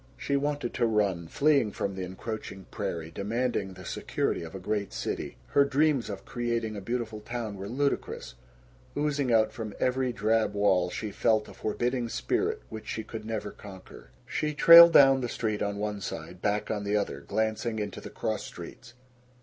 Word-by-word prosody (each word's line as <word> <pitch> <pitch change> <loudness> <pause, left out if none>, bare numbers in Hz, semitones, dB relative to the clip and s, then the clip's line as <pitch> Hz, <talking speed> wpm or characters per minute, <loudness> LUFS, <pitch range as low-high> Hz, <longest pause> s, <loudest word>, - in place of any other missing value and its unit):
She 140 - -1
wanted 145 -3 -1
to 120 - +2
run, 100 -6 +1
fleeing 140 - +3
from 100 - -2
the 95 - -5
encroaching 95 +1 -6
prairie, 80 -1 -4
demanding 105 0 -2
the 90 -1 -11
security - - -2
of 80 +2 -8
a - - -5
great 100 +1 -2
city. - - -4
Her 140 - +5
dreams 140 -2 +2
of 100 -2 -6
creating 115 -2 -2
a 100 - -5
beautiful 115 0 -3
town 110 -1 -5
were 100 +1 -6
ludicrous. 140 - -2 0.6
Oozing 145 -3 0
out 110 -1 +4
from 110 -4 -6
every 130 0 +1
drab 110 -2 +1
wall, 95 -3 +3
she 105 +4 -4
felt 110 0 +2
a - - -11
forbidding 120 +3 -1
spirit - - -1
which 110 -1 -8
she 110 - -3
could 110 0 -7
never 110 -2 -3
conquer. 95 -3 -12 0.2
She 150 +4 -2
trailed 170 +2 +10
down 135 -1 +7
the 120 - -2
street 110 -3 -2
on 100 0 -1
one 105 -1 -3
side, 85 0 -6
back 105 +1 0
on 105 -2 -2
the 100 +1 +1
other, 100 -9 -2
glancing 110 +5 -1
into 105 -2 -4
the - - -8
cross - - -2
streets. 120 - -10
110 Hz, 180 wpm, -28 LUFS, 100-125 Hz, 0.6 s, trailed